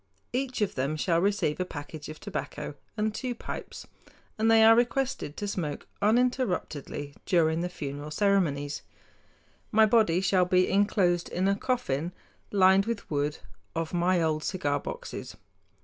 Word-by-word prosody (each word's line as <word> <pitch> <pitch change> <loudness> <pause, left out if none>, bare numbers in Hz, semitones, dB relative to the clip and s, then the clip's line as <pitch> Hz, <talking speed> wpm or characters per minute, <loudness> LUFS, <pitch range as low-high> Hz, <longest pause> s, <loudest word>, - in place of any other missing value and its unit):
Each 255 -2 -2
of 205 -2 +1
them 140 +4 -1
shall 165 +2 +1
receive 195 -6 +1
a - - +2
package 150 -2 -8
of 155 - -8
tobacco - - -5 0.2
and 215 0 0
two 250 +1 -3
pipes, - - -7 0.5
and 220 +1 +2
they 225 0 +7
are 225 +1 +8
requested 245 - 0
to 205 - -3
smoke 165 -7 -3 0.2
uninterruptedly 205 - 0
during 165 -2 +3
the 180 - -2
funeral 145 -3 -6
ceremonies. 155 -6 +1 0.9
My 220 0 +6
body 215 -6 +4
shall 185 -1 +3
be 185 0 +3
inclosed 190 -3 +2
in 185 +2 0
a 200 - +3
coffin 180 - -1 0.4
lined 195 0 +5
with 230 -7 -4
wood 145 0 0 0.4
of 165 0 -2
my 175 +1 +2
old 155 -2 0
cigar 145 -6 -1
boxes. - - -7
180 Hz, 150 wpm, -28 LUFS, 155-215 Hz, 0.9 s, are